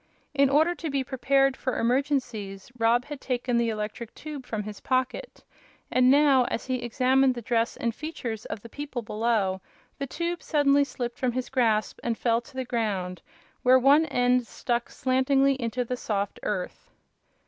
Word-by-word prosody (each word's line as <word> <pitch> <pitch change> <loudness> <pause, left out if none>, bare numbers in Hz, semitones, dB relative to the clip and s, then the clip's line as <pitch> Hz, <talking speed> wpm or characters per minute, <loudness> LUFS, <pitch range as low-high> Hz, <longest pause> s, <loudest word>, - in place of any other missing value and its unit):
In 280 -1 +4
order 310 +5 +4
to 335 -2 -5
be 275 -1 0
prepared 270 +1 +2
for 255 - -3
emergencies 240 -6 -1
Rob 235 +2 +3
had 290 -2 -8
taken 245 -1 -1
the 235 -1 +2
electric 215 +1 -5
tube 290 -4 -8
from 215 -2 -3
his 210 0 -8
pocket, 260 - -2 0.5
and 255 0 +4
now, 275 -2 +5
as 230 - -3
he 255 -2 -2
examined 255 +2 +2
the 240 - -5
dress 230 0 0
and 235 -1 -1
features 245 -7 -5
of 210 - -6
the - - -8
people 270 -1 -6
below, 210 -4 0 0.4
the 275 - -3
tube 340 +5 -3
suddenly 285 -2 +3
slipped 245 -3 -5
from 250 -2 0
his 255 0 -3
grasp 225 -5 +1
and 235 -2 -1
fell 230 -1 +1
to 265 +3 -18
the 260 -1 -3
ground, 195 -7 -2 0.4
where 255 +1 +6
one 285 +5 +5
end 245 -2 +2
stuck 240 +1 -2
slantingly 270 +1 +2
into 240 +2 -1
the 250 - -2
soft 200 -4 -2
earth. 190 -4 -4
250 Hz, 170 wpm, -26 LUFS, 230-275 Hz, 0.5 s, where